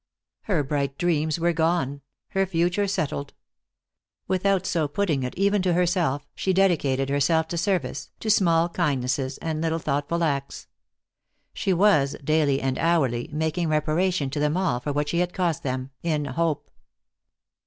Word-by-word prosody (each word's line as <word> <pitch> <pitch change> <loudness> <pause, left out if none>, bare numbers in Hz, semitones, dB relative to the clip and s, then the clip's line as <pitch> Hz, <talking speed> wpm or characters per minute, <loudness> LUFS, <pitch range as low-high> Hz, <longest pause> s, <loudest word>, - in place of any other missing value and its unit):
Her 175 -8 +1
bright 140 -1 -2
dreams 160 -2 +1
were 170 +1 +2
gone, 160 -4 0 0.3
her 195 0 0
future 180 +3 +1
settled. 145 -7 -3 0.9
Without 190 0 +1
so 165 -5 0
putting 155 -2 0
it, 125 -1 -4
even 200 +1 +2
to 180 -1 +1
herself, 170 -5 +1
she 190 - -1
dedicated 150 -8 +2
herself 150 +3 +2
to 170 - -3
service, 160 -9 -1
to 215 - 0
small 170 -5 +3
kindnesses, 135 -6 -1
and 160 -1 -2
little 165 0 0
thoughtful 150 +2 -1
acts. 140 -3 -2 0.9
She 195 - -1
was, 165 -7 +3
daily 150 -2 +2
and 130 -1 -1
hourly, 135 -8 +1
making 160 +2 -1
reparation 155 0 +1
to 145 - -3
them 150 +3 +1
all 180 -10 +1
for 145 +4 -3
what 145 +1 -1
she 170 +3 0
had 180 0 -1
cost 170 -3 0
them, 130 -2 -3
in 155 -3 -1
hope. 155 +2 -2
160 Hz, 155 wpm, -25 LUFS, 140-175 Hz, 0.9 s, small